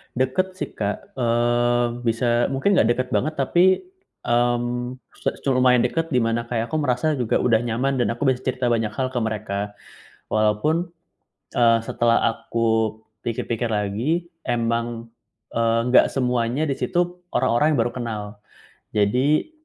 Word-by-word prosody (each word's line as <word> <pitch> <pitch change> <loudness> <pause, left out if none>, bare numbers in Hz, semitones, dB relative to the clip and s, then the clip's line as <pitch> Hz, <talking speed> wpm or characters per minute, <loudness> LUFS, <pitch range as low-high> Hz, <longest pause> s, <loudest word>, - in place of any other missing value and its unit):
Dekat 160 +9 0
sih 185 - -5
Kak, 100 -1 -3
eee, 120 0 +2 0.2
bisa 120 +1 +2
mungkin 180 +9 +1
nggak - - +4
dekat 130 +1 -2
banget 155 +4 0
tapi, 175 - +3 0.4
mmm, 120 +1 0 0.2
su - - -4
cu 140 - 0
lumayan 125 -2 +4
dekat 165 +7 0
di 125 - +3
mana 115 +1 -1
kayak 115 -1 -2
aku 155 - 0
merasa 145 +1 0
juga 120 -3 +1
udah 115 -3 +4
nyaman 120 +4 -1
dan 120 -1 +1
aku 120 - -11
bisa 130 - 0
cerita 125 -1 0
banyak 110 -2 0
hal 130 +1 -1
ke 125 - -2
mereka. 110 -3 -2 0.7
Walaupun, 110 +11 +1 0.7
eee, 115 -1 +4
setelah 115 0 +2 0.2
aku 110 -2 0 0.2
pikir-pikir 115 0 -2
lagi, 110 - -1 0.2
emang, 115 -1 -2 0.4
eee, 115 0 +2
nggak - - +6
semuanya 125 +2 0
di 140 - 0
situ, 175 +4 -1 0.2
orang-orang 150 +5 +2
yang - - 0
baru 120 - -3
kenal. 115 -4 -4 0.7
Jadi, 125 - +2
120 Hz, 145 wpm, -23 LUFS, 115-130 Hz, 0.7 s, nggak